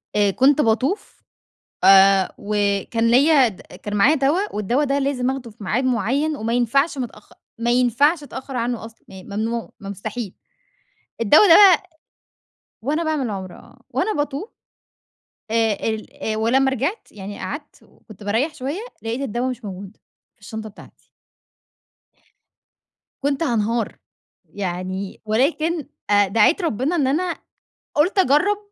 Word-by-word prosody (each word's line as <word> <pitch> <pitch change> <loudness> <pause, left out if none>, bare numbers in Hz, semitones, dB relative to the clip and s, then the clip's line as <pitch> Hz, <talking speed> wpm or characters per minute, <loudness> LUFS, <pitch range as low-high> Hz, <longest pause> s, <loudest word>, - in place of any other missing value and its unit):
آآ، 205 -1 +3
كنت 275 +7 +4
باطوف، 255 - -1 0.6
آآ 195 -1 +6
وكان 205 +2 0
ليَّ 275 0 +5
د 195 - -13
كان 205 0 -8
معايا 235 +10 +5
دوا، 310 - 0
والدوا 235 +8 0
ده 280 0 0
لازم 270 -2 0
آخده 260 -4 -6
في 215 - -13
ميعاد 230 +6 0
معين، 260 +6 0
وما 225 +2 -2
ينفعش 275 +6 +1
متأخ 245 -3 -7 0.3
ما 235 +1 +1
ينفعش 260 +6 +2
أتأخر 265 -2 -7
عنه 235 -1 -2
أصلًا، 225 0 -15
يعني 190 -1 -11
مي 200 - -7
ممنوع، 230 +2 -2
مُ 195 - -7
مُستحيل. 210 +1 -6 0.9
الدوا 265 - +6
ده 330 - +9
بقى 380 -3 +7 1.0
وأنا 305 +6 0
باعمل 305 -6 -1
عُمرة، 190 -3 -6
آه، - - -18
وأنا 435 - 0
باطوف 290 - -3 1.0
آآ، 225 -2 +2
ال 220 0 -4
ولمّا 260 +5 +2
رجعت 280 - -2
يعني، 200 0 -8
قعدت 290 0 -7
وكنت 215 -2 -16
باريح 230 +10 0
شويّة. 280 +10 -4 0.2
لقيت 230 +4 -3
الدوا 250 0 -2
مش 245 -3 -6
موجود! 195 +1 -8 0.4
في - - -40
الشنطة 220 +1 -7
بتاعتي. 205 - -17 2.2
كنت 280 +2 0
هانهار. 230 -4 -1 0.5
يعني، 185 0 -5
ولكن 295 +8 0 0.2
آآ 205 -1 +4
دعيت 225 - +3
ربنا 300 - -1
إن 290 -6 +1
أنا 340 +6 0 0.6
قُلت 325 +8 +2
أجرّب 375 +6 +3
240 Hz, 140 wpm, -21 LUFS, 210-285 Hz, 2.2 s, ده